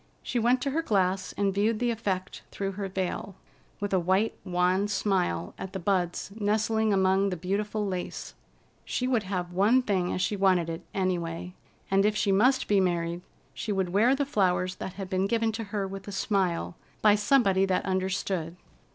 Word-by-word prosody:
She 245 - -1
went 245 +2 +2
to 275 - -1
her 320 +4 0
glass 190 - 0
and 200 -1 +1
viewed 210 +3 +1
the 240 +1 +1
effect 190 -5 -3
through 195 -1 -3
her 195 0 -4
veil, 190 0 -3 0.4
with 205 -1 -3
a 190 - +4
white, 190 +5 +1
wan 180 +2 +1
smile 85 - 0
at 190 0 -6
the 190 - -3
buds 180 0 -1
nestling 215 +1 +1
among 190 0 +3
the 180 - -3
beautiful 205 +4 -2
lace. 185 -2 -4 0.5
She 250 - -2
would 250 -3 +2
have 180 -3 -4
one 215 +8 +4
thing 185 -5 0
as - - -2
she 205 - 0
wanted 185 -4 +2
it, 165 +1 -5
any 185 -2 0
way: 170 +2 -6 0.4
if 200 +2 +3
she 210 -1 +1
must 250 +7 +3
be 205 -1 +4
married, 175 -2 0 0.3
she 210 - -4
would 190 -2 0
wear 235 +7 +4
the 285 +1 0
flowers 185 -7 +1
that 190 - -6
had 195 -1 -6
been 190 0 0
given 225 0 +1
to 225 0 -5
her 200 -1 -3
with 195 0 -8
a - - -5
smile 190 -4 0 0.3
by 210 -1 +7
somebody 205 -3 +3
that 185 -1 0
understood. 185 -3 -1
195 Hz, 185 wpm, -28 LUFS, 185-210 Hz, 0.5 s, by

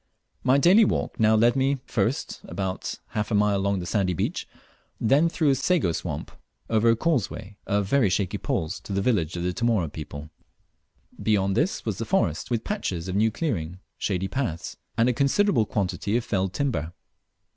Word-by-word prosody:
My 130 +1 +4
daily 185 +10 +6
walk 200 - -1
now 110 0 +5
led 120 +3 +4
me, 135 +1 +2
first - - -1
about 95 -2 -3
half 105 -1 -2
a 110 - +1
mile 105 -1 +3
along 100 0 0
the - - -5
sandy 95 -2 0
beach, 110 - -2 0.5
then 140 +9 +4
through 160 -3 +2
a - - +4
sago 135 - +1
swamp - - -4 0.4
over 115 +1 +4
a 115 - +5
causeway 115 - -1
of 100 -1 +1
very 115 0 +3
shaky 95 0 -1
poles 80 +4 -2
to 100 - -7
the 100 - +1
village 90 -9 +1
of 85 - -3
the 90 0 -1
Tomore 110 -7 +1
people. 75 0 -8 0.9
Beyond 100 -3 +2
this 155 - 0
was 110 -4 -2
the 115 - -2
forest 195 +7 0
with 120 -3 -1
patches 95 - -3
of 95 - -3
new 110 +2 +3
clearing, 95 - -3 0.2
shady 95 -1 -1
paths, 95 - -3 0.2
and 115 - +4
a 125 - +3
considerable 140 - +2
quantity 100 +2 -1
of 120 - -3
felled 95 -4 0
timber. 95 - -2
105 Hz, 180 wpm, -25 LUFS, 95-130 Hz, 0.9 s, daily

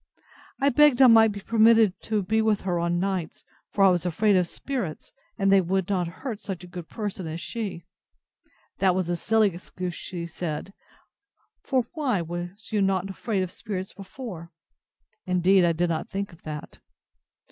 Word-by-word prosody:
I 275 +1 +4
begged 290 -1 +5
I 265 - +8
might 225 -2 +7
be 200 0 -7
permitted 225 -1 +5
to 215 -2 0
be 220 +4 +1
with 220 -2 +1
her 180 -2 -1
on 170 0 0
nights; 185 -3 -3 0.3
for 200 - +1
I 195 - +8
was 175 -2 +1
afraid 200 +4 +2
of 180 -2 +3
spirits, 225 - -5 0.2
and 195 -2 +2
they 195 -1 +6
would 190 +1 -1
not 180 -3 0
hurt 215 +6 -6
such 190 -4 -6
a - - -10
good 175 -2 -9
person 205 -5 -4
as 160 +1 -5
she. 195 -4 -5 0.9
That 190 -2 +3
was 185 -2 -1
a 175 - +1
silly 210 +2 +2
excuse, 180 0 -6
she 170 -1 -6
said; 170 +2 -5 0.9
for 260 -4 0
why 275 - 0
was 175 +5 -7
not 195 -3 +2
you 195 - -7
afraid 195 0 -2
of 185 - -5
spirits 190 -2 -5
before?—(Indeed 185 -1 -3
I 170 - +4
did 170 +1 0
not 160 - -3
think 200 -1 -4
of 165 - -17
that.) 150 -1 -8
190 Hz, 175 wpm, -26 LUFS, 175-215 Hz, 0.9 s, I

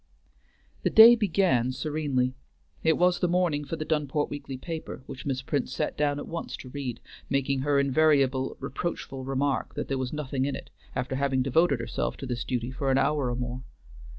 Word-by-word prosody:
The - - +1
day 225 +2 +10
began 185 - +2
serenely. 135 -2 -1 0.5
It 160 0 +3
was 180 0 +3
the 180 - +2
morning 175 -4 +1
for 155 - -4
the 155 -1 -4
Dunport 150 -2 0
weekly 140 -2 -6
paper, 160 -2 -6
which 135 +2 -8
Miss 135 -1 -1
Prince 135 -1 -1
sat 150 - -2
down 145 -1 +1
at 145 - -6
once 170 0 -5
to 130 - -10
read, 125 -3 -5 0.3
making 140 0 +1
her 140 +1 +2
invariable 140 -2 +2
reproachful 135 -3 -4
remark 135 -1 -1
that - - -4
there 135 -1 -1
was 130 -1 -2
nothing 140 -3 -2
in 140 - -1
it, - - -9 0.2
after 130 +1 -2
having 135 -2 +1
devoted 140 +1 +3
herself 115 - -3
to 140 - -6
this 125 -1 -3
duty 125 -1 -2
for 135 +1 -2
an 135 - +3
hour 145 -3 +1
or 120 - -1
more. 125 0 -4
140 Hz, 190 wpm, -27 LUFS, 130-155 Hz, 0.5 s, day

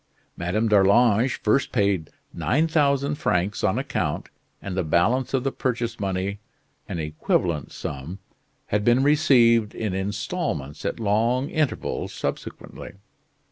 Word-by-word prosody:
Madame 90 +7 -1
d'Arlange 105 +4 +4
first 110 +6 +2
paid 100 -8 +1 0.2
9,000 140 - +1
francs 105 - -1
on 105 +2 +2
account 130 - -2 0.3
and 95 -2 -6
the 95 - 0
balance 115 +12 +1
of 135 -2 0
the 135 - 0
purchase 120 -3 -2
money 100 0 -2 0.5
(an - - -3
equivalent 75 0 -1
sum) 70 +7 -6 0.5
had 105 0 0
been 120 +4 +4
received 125 -7 +4
in 110 -4 -2
instalments 100 - -3
at - - -2
long 115 +5 +1
intervals 155 -3 -2
subsequently. - - -6
110 Hz, 120 wpm, -24 LUFS, 95-130 Hz, 0.5 s, d'Arlange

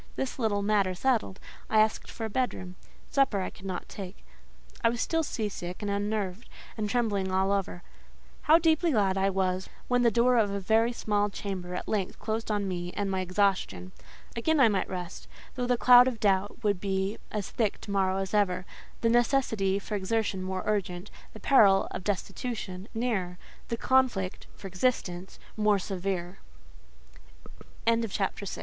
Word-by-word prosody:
This 265 0 -3
little 205 -4 +1
matter 200 -3 +2
settled, 225 -3 0 0.3
I 220 - +4
asked 215 0 +1
for 225 - -5
a - - -3
bedroom; 195 -7 -2 0.4
supper 270 -7 +2
I - - -3
could 195 - -11
not 185 -2 -4
take: 195 -1 -9 0.6
I 230 - +5
was 235 0 -3
still 325 +7 +1
sea 230 -8 -2
sick 180 -1 -6
and 205 - -1
unnerved, 205 0 -2 0.3
and 210 -2 -2
trembling 205 -5 0
all 190 +1 +2
over. 195 -3 -2 0.7
How 320 - +9
deeply 325 0 +2
glad 195 -4 +2
I 195 0 +2
was 190 -1 -1 0.2
when 245 0 +2
the 240 - +5
door 240 +3 +3
of 215 -3 +3
a 200 0 -2
very 225 +4 +2
small 210 -3 0
chamber 185 -3 -5
at - - -5
length 200 -4 -1
closed 225 +1 -3
on 205 -2 0
me 175 -1 -3
and 200 -1 -2
my 190 - 0
exhaustion. 185 - 0 0.4
Again 310 +7 +1
I 245 -4 +7
might 200 -3 0
rest: 180 -1 -6 0.3
though 250 -1 -2
the 245 0 +2
cloud 245 +1 +8
of 245 -4 -2
doubt 205 +3 +1
would 205 -4 +1
be 195 +1 -1
as 210 -3 -4
thick 220 -4 0
to 205 - -7
morrow 190 -1 +1
as 195 0 -3
ever; 190 -3 +1 0.4
the 230 - +3
necessity 230 -5 +2
for 200 +2 -6
exertion 205 -1 -1
more 185 0 -3
urgent, 190 -2 -2 0.2
the 220 - -10
peril 200 -8 +5
(of - - -5
destitution) 205 -1 -4
nearer, 205 -7 -1 0.3
the 230 - -2
conflict 240 -8 +1
(for - - -13
existence) 185 -2 -2 0.2
more 210 -1 +3
severe. 185 -1 -3 1.5
CHAPTER 230 0 +2
VII. - - -11
VILLETTE. 200 0 -2
205 Hz, 175 wpm, -28 LUFS, 190-230 Hz, 1.5 s, How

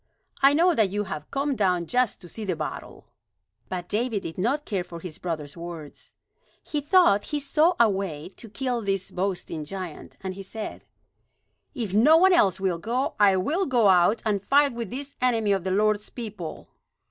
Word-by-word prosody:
I 275 +1 +6
know 350 +3 +4
that 220 -9 +2
you 205 +2 -1
have 155 -6 -7
come 275 0 -1
down 180 -5 +1
just 245 +4 0
to 175 - -11
see 220 +5 -7
the 185 -4 -1
battle." - - -6 0.6
But 180 -1 -4
David 220 0 -1
did 165 +2 -6
not 270 +10 0
care 195 -4 -2
for 170 -1 -9
his 165 -2 -9
brother's 155 -5 -4
words. 170 -3 -9 0.5
He 295 - -3
thought 295 - +4
he 295 - -2
saw 305 +5 +2
a 235 - +7
way 190 -6 -3
to 225 +3 -12
kill 250 +1 -2
this 195 -2 -2
boasting 180 -4 -3
giant; 180 0 -8
and 190 -1 -4
he 195 - -8
said: 215 +3 -7 0.9
"If 225 -8 -3
no 280 +10 +6
one 375 +2 +5
else 195 - +3
will 185 -3 0
go, 240 +8 -1
I 200 -2 +5
will 325 - 0
go 235 -6 +4
out 180 +4 +4
and 205 -3 +1
fight 280 +5 +3
with 235 -4 -5
this 280 +3 -6
enemy 230 -5 +2
of 195 -3 +1
the 190 - -2
Lord's 210 +2 +1
people." 210 -9 -7
205 Hz, 190 wpm, -25 LUFS, 185-255 Hz, 0.9 s, a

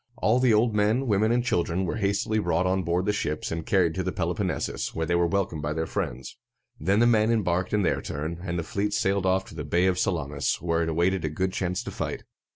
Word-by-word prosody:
All 115 +4 +2
the 125 -2 +4
old 110 +1 +3
men, 105 +5 +2
women, 110 -1 +2
and 120 +1 +1
children 90 -4 0
were 90 - -2
hastily 100 +1 0
brought 85 -2 +1
on 95 +1 +1
board 90 +2 0
the 105 - +1
ships, 90 -8 -2
and 80 0 -3
carried 90 -4 +3
to 95 - -2
the 95 0 -2
Peloponnesus, 90 - -2
where 80 - -1
they 85 - -1
were 85 0 +3
welcomed 95 -4 -1
by 75 +1 -2
their 80 +1 -2
friends. 65 -3 -4 0.4
Then 95 +6 +1
the 120 - +5
men 110 -2 +4
embarked 95 -5 0
in 105 -1 +2
their 85 - +1
turn, 80 +4 -4
and 85 -1 -3
the 85 - -1
fleet 100 +5 -2
sailed 95 -1 +1
off 95 +1 +2
to - - -12
the - - -5
Bay 85 +2 +1
of 95 -1 +2
Sal´a 85 -6 0
mis, 70 -1 -1
where 85 0 0
it 80 - 0
awaited 85 +3 +1
a 75 - 0
good 95 +5 -2
chance 90 -1 -2
to - - -6
fight. - - -4
95 Hz, 250 wpm, -26 LUFS, 85-105 Hz, 0.4 s, the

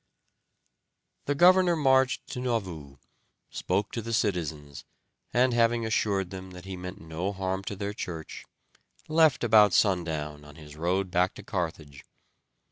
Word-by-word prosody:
The 145 - 0
governor 180 +2 +5
marched 130 -3 +2
to - - -5
Nauvoo, 90 - -3 0.5
spoke 100 0 -1
to 115 - -4
the 115 +1 -5
citizens, 80 -10 -2 0.5
and, 125 +1 +3
having 115 0 +2
assured 100 -4 0
them 95 0 -8
that 90 0 -11
he 95 -1 -6
meant 90 +2 -8
no 80 +4 -4
harm 95 -1 -3
to 100 - -4
their 100 +1 -4
church, 80 -5 -7 0.6
left 155 -4 +3
about 105 -4 +6
sundown 80 -7 0
on 75 0 -14
his 75 -1 -12
road 90 +4 -1
back 90 +1 +1
to 105 - -10
Carthage. 80 -8 -5
95 Hz, 140 wpm, -27 LUFS, 85-115 Hz, 0.6 s, about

